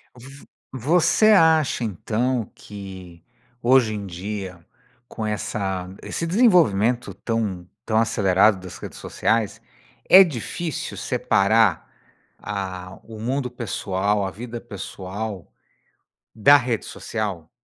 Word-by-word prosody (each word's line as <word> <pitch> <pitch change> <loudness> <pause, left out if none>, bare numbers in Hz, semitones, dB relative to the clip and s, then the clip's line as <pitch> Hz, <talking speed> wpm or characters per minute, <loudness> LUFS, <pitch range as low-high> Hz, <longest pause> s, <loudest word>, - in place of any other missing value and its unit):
Vo 135 +3 -13 0.5
você 215 +5 +4
acha 160 -8 +4
então 115 +4 -1
que, 95 -4 -11 0.4
hoje 120 -3 +4
em 100 -1 -5
dia, 95 -1 -6 0.4
com 110 - -6
essa 95 -3 -3 0.2
esse 165 - -4
desenvolvimento 160 - +3
tão 100 -6 -3 0.2
tão 110 - 0
acelerado 100 -2 +3
das 90 -1 -10
redes - - -9
sociais, 115 -2 -1 0.5
é 190 - +10
difícil 160 - -5
separar, 100 -2 +2 0.5
ah, 95 -2 -6
o 110 0 -10
mundo 130 +2 -1
pessoal, 100 -4 -1
a - - -3
vida 120 +1 -7
pessoal, 100 -2 -7 0.8
da 140 +7 +6
rede 125 -4 -2
social? 100 -8 -5
110 Hz, 105 wpm, -23 LUFS, 95-125 Hz, 0.8 s, é